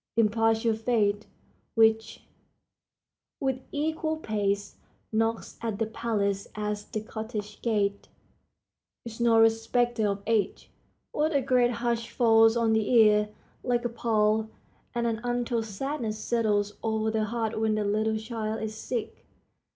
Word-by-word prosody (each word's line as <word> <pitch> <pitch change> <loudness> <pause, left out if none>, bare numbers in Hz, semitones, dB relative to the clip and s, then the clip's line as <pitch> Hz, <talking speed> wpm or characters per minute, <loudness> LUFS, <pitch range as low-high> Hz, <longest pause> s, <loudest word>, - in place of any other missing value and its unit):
impartial 225 +1 +3
fate, 215 -2 0 0.5
which, 225 0 +2 1.2
"With 265 -2 -1
equal 315 +1 -1
pace, 205 -6 -2 0.3
Knocks 225 +1 -1
at 225 -3 -2
the 225 - 0
palace 210 -3 -1
as 210 -1 -3
the 215 - -4
cottage 215 -1 -6
gate," 205 -3 0 1.0
is 230 -1 -8
no 230 -1 +4
respecter 225 0 +2
of 200 0 -2
age. 220 -3 -1 0.4
What 305 +1 0
a 280 - +4
great 250 -2 +3 0.2
hush 235 -1 0
falls 225 -1 +5
on 230 -1 +2
the 220 -1 +1
ear, 210 -3 +5 0.3
like 245 -1 0
a - - +1
pall, 220 -2 +1 0.5
and 235 0 0
an 225 -1 -1
untold 240 -1 -1
sadness 225 +1 -3
settles 210 -3 0
over 220 0 0
the 220 -1 0
heart 225 0 -2
when 220 -1 +1
the 215 - 0
little 215 +2 +1
child 220 -1 -4
is 215 0 -3
sick. 225 +1 -5
225 Hz, 135 wpm, -27 LUFS, 215-235 Hz, 1.2 s, falls